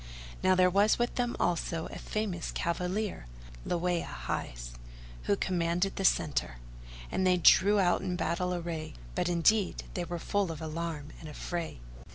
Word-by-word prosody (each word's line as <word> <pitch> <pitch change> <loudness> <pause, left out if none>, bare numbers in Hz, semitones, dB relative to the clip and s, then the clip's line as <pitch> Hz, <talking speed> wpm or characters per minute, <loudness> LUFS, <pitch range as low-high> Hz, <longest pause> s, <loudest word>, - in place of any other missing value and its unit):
Now 185 0 +4
there 185 0 +5
was 200 +3 +4
with 240 0 0
them 245 -1 -1
also 165 -1 0
a - - -7
famous 205 -6 -3
cavalier, 180 - -2 0.4
Láwiyá 175 0 0
hight, - - -4 0.5
who 100 - +3
commanded 175 - 0
the 195 - -1
centre; 145 - +2 0.6
and - - 0
they 180 0 +4
drew 200 +4 +6
out 180 -2 +3
in 185 -1 -2
battle 180 0 -1
array, 170 -3 -4 0.2
but 170 - 0
indeed 185 +4 +2
they 180 - -2
were 175 +1 -4
full 195 +1 0
of 160 - -6
alarm 160 -2 -4
and 160 - -9
affray. 165 - -4
175 Hz, 155 wpm, -30 LUFS, 165-190 Hz, 0.6 s, drew